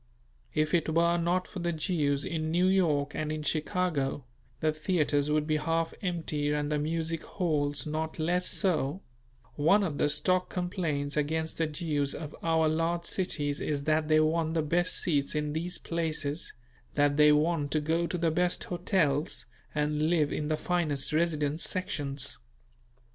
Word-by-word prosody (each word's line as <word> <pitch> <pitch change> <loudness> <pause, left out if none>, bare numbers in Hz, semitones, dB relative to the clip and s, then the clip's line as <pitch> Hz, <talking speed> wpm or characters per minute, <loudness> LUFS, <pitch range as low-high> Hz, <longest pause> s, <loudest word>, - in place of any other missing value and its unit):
If 155 0 +1
it 165 -2 +2
were 170 +2 +3
not 175 +2 0
for 195 - -7
the 170 0 -1
Jews 150 -4 0
in 155 -1 -2
New 175 +3 +2
York 155 -7 +2
and 155 0 -2
in 155 0 -3
Chicago, 150 -4 -1 0.3
the 155 - +2
theatres 155 -3 +1
would 150 0 +1
be 155 0 +1
half 165 +2 -1
empty 160 -5 -1
and 150 0 -1
the 150 - +1
music 165 +1 -2
halls 145 -6 -1
not 155 +1 -3
less 175 +3 0
so; 180 -2 0 0.5
one 195 +8 +4
of 155 -6 -2
the 145 - +3
stock 185 +4 +1
complaints 165 -6 -2
against 160 +2 -1
the 165 - +2
Jews 150 -2 -2
of 155 -2 -7
our 160 -1 +2
large 165 +2 0
cities 145 -7 -1
is 145 -2 -1
that 155 0 +1
they 155 0 +5
want 160 +1 +1
the 160 - +2
best 175 +4 +1
seats 145 -4 +1
in 150 -1 -1
these 170 +3 -2
places, 160 -2 -2 0.4
that 145 0 +3
they 150 0 +6
want 150 0 +2
to 155 - +1
go 165 +3 0
to 180 - -3
the 165 -1 +1
best 175 +2 +1
hotels 165 -5 0 0.3
and 150 +1 +1
live 155 -4 +2
in 150 - -2
the 155 0 0
finest 155 -7 -1
residence 155 -1 +1
sections. 145 -8 0
155 Hz, 165 wpm, -29 LUFS, 150-170 Hz, 0.5 s, they